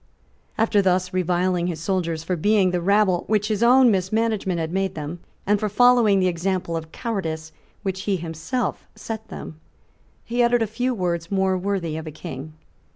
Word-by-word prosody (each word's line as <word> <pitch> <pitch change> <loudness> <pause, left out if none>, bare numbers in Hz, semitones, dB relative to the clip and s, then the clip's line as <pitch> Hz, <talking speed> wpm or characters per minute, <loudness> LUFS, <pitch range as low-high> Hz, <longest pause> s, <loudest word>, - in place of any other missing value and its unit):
After 220 -2 +3
thus 185 -1 +1
reviling 180 0 +1
his 170 -3 -3
soldiers 165 -2 -1
for 180 - -1
being 195 +2 +3
the 180 -1 -1
rabble 195 -1 +3
which 210 0 +1
his 215 -1 -1
own 250 +1 +6
mismanagement 195 -1 0
had 160 0 -2
made 190 -1 -1
them, 155 +3 -5 0.3
and 205 +1 +2
for 215 - -1
following 235 -2 +5
the 185 - +3
example 180 0 -1
of 160 -1 -5
cowardice 160 -10 -4 0.3
which 190 -1 -2
he 200 - +1
had 175 - -5
himself 170 +8 -3
set 220 -1 -6
them, 155 - -9 0.6
he 240 +1 -1
uttered 240 -1 +3
a - - +1
few 245 +4 -2
words 170 -4 -2
more 190 -1 +1
worthy 185 -4 -2
of 160 0 -6
a - - -5
King. 155 -1 -8
190 Hz, 180 wpm, -23 LUFS, 170-215 Hz, 0.6 s, own